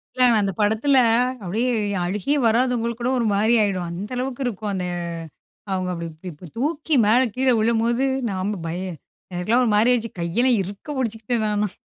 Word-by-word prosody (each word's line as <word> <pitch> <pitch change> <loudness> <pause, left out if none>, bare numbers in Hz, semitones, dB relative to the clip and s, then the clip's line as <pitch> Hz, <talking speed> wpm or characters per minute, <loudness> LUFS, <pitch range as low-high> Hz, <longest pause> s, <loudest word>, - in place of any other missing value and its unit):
இல்ல, 255 - +3 0.2
அந்த 200 -1 0
படத்துல 220 +7 +3 0.5
அப்பிடீயே 225 +8 0 0.3
அழுகையே 210 +10 -1
வராதவங்களுக்கு 235 0 +1
கூட, 250 - +1
ஒரு 235 - 0
மாரி 215 +4 +3
ஆயிடும். 185 -4 -1
அந்த 195 +8 -5
அளவுக்கு 260 +1 -3
இருக்கும். 215 -3 -3
அந்த 185 -2 -2 0.9
அவுங்க 185 -1 -1
அப்டி 170 -1 -5 0.2
இப்டி 160 +4 -12
தூக்கி 300 +4 -1
மேல 220 +4 +5 0.2
கீழ 260 +1 +1
விழும்போது, 235 +3 +1 0.2
நாம 195 +1 -2
பய 175 +3 -3 0.5
எனக்கெல்லாம் 215 +8 +2
ஒரு 225 - +1
மாரி 215 +4 +4
ஆயிடுச்சு. 230 -2 -2
கையெல்லாம் 235 +9 +2
இறுக்க 195 +6 -8
புடுச்சுக்கிட்டேன் 225 -2 -1
நானும். 210 -2 -1
220 Hz, 155 wpm, -22 LUFS, 195-245 Hz, 0.9 s, மேல